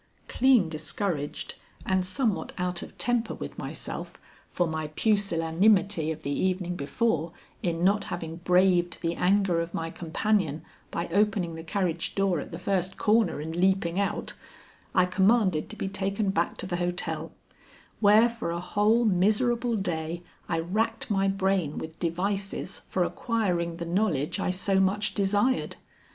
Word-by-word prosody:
Clean 250 -8 +4
discouraged 155 -1 -3 0.3
and 190 -1 +2
somewhat 190 - -1
out 180 -1 -1
of - - -10
temper 245 -1 0
with - - -7
myself - - -6 0.3
for 175 - 0
my 160 -1 -3
pusillanimity 195 -3 +2
of 160 - -7
the 140 - -2
evening 180 +2 0
before 165 +1 -1 0.3
in 170 -3 -1
not 200 +2 +3
having 165 -1 -5
braved 180 0 +3
the 165 0 +1
anger 185 -1 +2
of 170 0 -5
my 165 0 -3
companion 165 -2 0 0.3
by 170 - -3
opening 195 -2 +1
the 165 0 -7
carriage 170 -1 -2
door 195 -4 +2
at - - -7
the 165 - -5
first 185 0 -1
corner 215 -7 +2
and 160 +2 -5
leaping 185 0 +2
out, 200 - -1 0.6
I 185 -2 +5
commanded 190 -2 +2
to - - -7
be - - -3
taken 195 +1 -1
back 170 -2 0
to - - -3
the 175 -1 -2
hotel, 175 0 -2 0.7
where 215 +2 +6
for 235 -6 -4
a 170 0 -2
whole 210 +6 +2
miserable 230 +5 +2
day 170 -3 -3 0.3
I 165 - +1
racked 220 +7 -1
my 195 -1 +2
brain 190 -5 0
with 160 +1 -7
devices 195 +3 -2
for 185 - +1
acquiring 175 -5 -1
the 170 - -4
knowledge 170 -3 0
I 190 - 0
so 190 +1 +1
much 200 +2 +1
desired. 205 +6 +1
185 Hz, 150 wpm, -27 LUFS, 170-205 Hz, 0.7 s, where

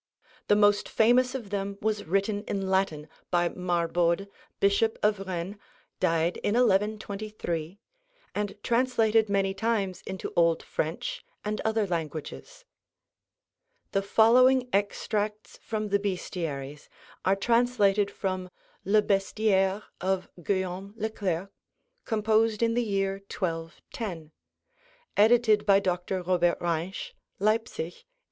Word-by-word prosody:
The 205 - +5
most 205 0 +3
famous 250 +3 +3
of 225 -6 -6
them 200 0 -3
was 215 -1 -1
written 200 +4 0
in 195 -1 -2
Latin 175 -6 0 0.2
by 175 -1 +2
Marbode, 175 +1 0 0.3
Bishop 200 +3 +2
of 210 -1 +3
Rennes 185 +2 -4 0.4
(died 165 +1 +1
in 205 - -1
1123), 205 -6 0 0.6
and 205 -1 -3
translated 230 -3 +2
many 195 -1 +1
times 195 -3 -1
into 190 0 -5
Old 165 -1 +3
French 160 +2 -3 0.2
and 210 0 -2
other 220 -1 +1
languages. 170 - -5 1.3
The 195 - +1
following 250 +5 +5
extracts 210 +1 -1
from 215 -1 -3
the 200 0 +2
Bestiaries 160 -8 -4 0.3
are 190 - +3
translated 210 -2 +2
from 185 -2 -3 0.3
'Le 210 +2 +3
Bestiaire' 195 0 +1 0.2
of 190 0 0
Guillaume 190 +2 -2
Le 220 +1 -2
Clerc, 190 -3 -2 0.6
composed 220 0 +2
in 230 0 +2
the 240 - +2
year 195 -3 -1
1210 165 0 -5 0.8
(edited 220 -1 +5
by 195 -1 +6
Dr. 180 0 -2
Robert 175 -1 +2
Reinsch, 175 - -3 0.2
Leipzig, 215 -5 0
1890). - - -34
200 Hz, 115 wpm, -28 LUFS, 180-215 Hz, 1.3 s, by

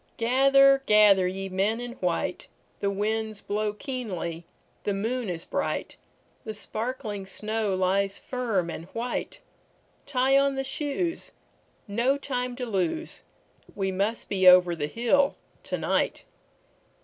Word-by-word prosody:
Gather, 275 +3 +5
gather, 205 -3 +6
ye 195 +1 -4
men 195 +4 0
in 245 0 -5
white; 180 0 -2 0.3
The 200 - 0
winds 215 +1 -2
blow 210 +1 -1
keenly, 190 - -5 0.4
the 205 - -1
moon 225 +2 -2
is 170 -1 -4
bright, - - -2 0.5
The 220 -1 -5
sparkling 215 -2 -4
snow 215 0 -1
lies 195 +1 +1
firm 220 -9 -2
and 165 - -7
white; 240 +2 -3 0.7
Tie 270 0 +3
on 275 0 +2
the 270 - -1
shoes, 295 +5 -3 0.6
no 235 +7 +1
time 250 -3 -3
to 250 0 -4
lose, 200 - -2 0.5
We 195 -1 -1
must 200 +5 -1
be 190 -2 +2
over 180 -1 +7
the 145 -2 -2
hill 245 - +2 0.3
to - - -2
night. - - 0
215 Hz, 130 wpm, -27 LUFS, 195-255 Hz, 0.7 s, over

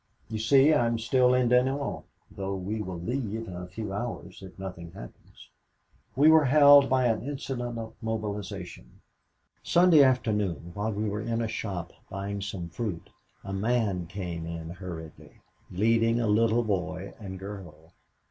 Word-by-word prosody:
"You 110 - -2
see, 135 +6 +5
I 120 -6 +3
am 115 0 0
still 125 +2 +3
at 125 -2 +2
Dinant, 130 +3 +1 0.3
though 100 0 -4
we 100 +4 -3
will 95 -4 -5
leave 115 +2 -3
in 90 - -7
a 90 0 -6
few 95 +2 -6
hours 100 -4 -5
if 95 -1 -12
nothing 90 -3 -8
happens! - - -13 0.6
We 140 +4 +5
were 160 -1 +7
held 145 0 +7
by 130 -1 +3
an 115 -3 +1
incident 125 -3 -4
of 115 -1 -6
mobilization. 105 -4 -5 0.6
Sunday 175 -3 +5
afternoon 105 - +1
while 105 +3 -2
we 105 +1 -2
were 105 +1 -2
in 115 +1 -2
a 115 - -1
shop 95 -6 -5 0.2
buying 100 +1 -4
some 95 -4 -5
fruit, 95 -2 -5 0.3
a 100 - -6
man 100 -4 0
came 85 -3 -5
in 85 0 -6
hurriedly, 85 -3 -9 0.3
leading 115 +4 +2
a 120 - 0
little 115 +2 +3
boy 95 -2 -3
and 95 -3 -7
girl. 90 -5 -10
105 Hz, 155 wpm, -28 LUFS, 95-120 Hz, 0.6 s, were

